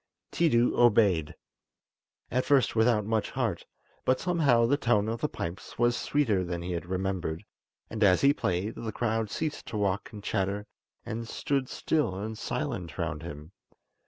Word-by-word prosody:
Tiidu 125 -8 +3
obeyed, 100 -9 +4 1.0
at 125 +2 +1
first 140 -5 +3
without 110 -2 +3
much 110 0 0
heart; 115 -10 -2 0.4
but 130 0 +2
somehow 145 -10 +3
the 135 +5 +3
tone 115 -7 +2
of 115 +1 -3
the 150 - 0
pipes 85 +3 -6
was 120 0 +3
sweeter 115 -12 +1
than 85 -1 -4
he 90 - -4
had 85 0 -3
remembered, 95 -3 -2 0.4
and 110 -1 -2
as 90 -2 +5
he 140 +1 +6
played, 95 -2 -1
the 110 - -5
crowd 110 -1 -1
ceased 155 +7 -3
to 110 - -4
walk 100 -1 -1
and 105 -2 -9
chatter, 100 +1 -1 0.4
and 115 0 -4
stood 135 +2 -1
still 150 -12 0
and 110 +3 -5
silent 85 -3 -3
round 75 - -2
him. 75 -1 -8
110 Hz, 160 wpm, -29 LUFS, 95-120 Hz, 1.0 s, he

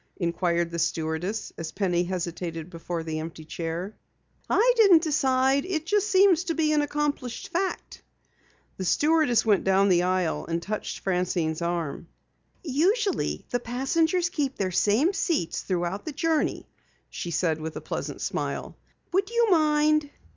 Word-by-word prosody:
inquired 170 -1 0
the 170 - -3
stewardess 165 +6 -2
as 165 -1 -5
Penny 180 -3 0
hesitated 170 -2 -4
beside 165 -1 -5
the 155 -1 -3
empty 160 0 -7
chair. 170 +5 -4 0.5
"I - - +4
didn't 395 -8 +6
decide. 270 -3 +2
It 325 -4 -3
just 415 +3 +1
seems 380 -3 +5
to 330 -3 -1
be 310 -2 +2
an 300 -1 +3
accomplished 290 -4 -2
fact." 375 +2 -3 0.8
The 190 - -4
stewardess 295 - +3
went 205 -4 +3
down 195 +1 +3
the 175 -2 +4
aisle 180 -2 0
and 165 0 -1
touched 210 +5 -5
Francine's 180 -3 -1
arm. 170 -2 -3 0.6
"Usually 370 - 0
the 245 - +1
passengers 320 +9 0
keep 285 -6 -2
their 190 -2 -1
same 225 - +2
seats 320 - -1
throughout 180 +1 -2
the 310 - -4
journey," 320 0 0 0.4
she 175 - -5
said 160 -1 0
with 160 0 -5
a - - -3
pleasant - - -5
smile. - - -3 0.4
"Would 390 +2 +1
you 470 -2 +2
mind?" 305 -2 +3
220 Hz, 145 wpm, -26 LUFS, -, 0.8 s, didn't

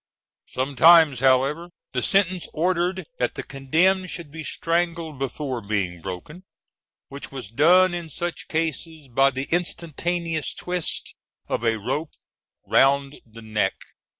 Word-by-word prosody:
Sometimes, 145 +2 +5
however, 135 +6 +2 0.2
the 125 - 0
sentence 185 0 +1
ordered 180 +2 0
that - - 0
the - - -5
condemned 175 +8 +1
should 165 -4 -7
be 160 +1 -7
strangled 165 -3 -2
before 135 -2 -3
being 100 -5 -2
broken, 95 - -8 0.7
which 140 +1 -8
was 130 -7 -7
done 175 +8 +5
in 170 -2 -5
such 175 +3 -5
cases 160 -2 -3
by 135 +3 +4
the 135 +1 -4
instantaneous 170 -1 -2
twist 180 -2 -4 0.3
of - - -2
a 115 -1 +2
rope 145 +9 -3 0.5
round 140 +1 +2
the 115 0 -13
neck. 105 -3 0
150 Hz, 125 wpm, -24 LUFS, 130-170 Hz, 0.7 s, Sometimes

